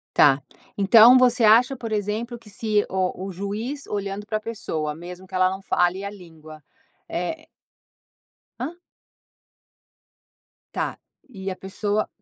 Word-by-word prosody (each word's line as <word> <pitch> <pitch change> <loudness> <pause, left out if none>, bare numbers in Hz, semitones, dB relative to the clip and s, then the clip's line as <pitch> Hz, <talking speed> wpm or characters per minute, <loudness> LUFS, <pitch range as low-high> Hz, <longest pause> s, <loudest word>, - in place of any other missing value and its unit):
Tá, 140 -1 +6 0.4
então 225 +5 +8
você 250 -1 +4
acha 235 +5 +6
por 230 -3 -6
exemplo 215 +3 -2
que 220 -2 -15
se 210 0 0
o 185 0 -2
o - - -5
juiz 210 +9 -4
olhando 200 0 -4
pra 215 0 -2
pessoa, 160 -9 -4
mesmo 180 +3 -10
que 185 - -9
ela 185 0 +4
não 190 +1 -5
fale 180 +1 +1
a 200 - -3
língua 160 -6 -13 0.5
é 315 - -4 1.1
ham? 310 +8 -4 2.0
Tá, - - -3 0.3
e 195 -5 -6
a 185 - -4
pessoa 205 +3 -2
205 Hz, 135 wpm, -24 LUFS, 185-230 Hz, 2.0 s, então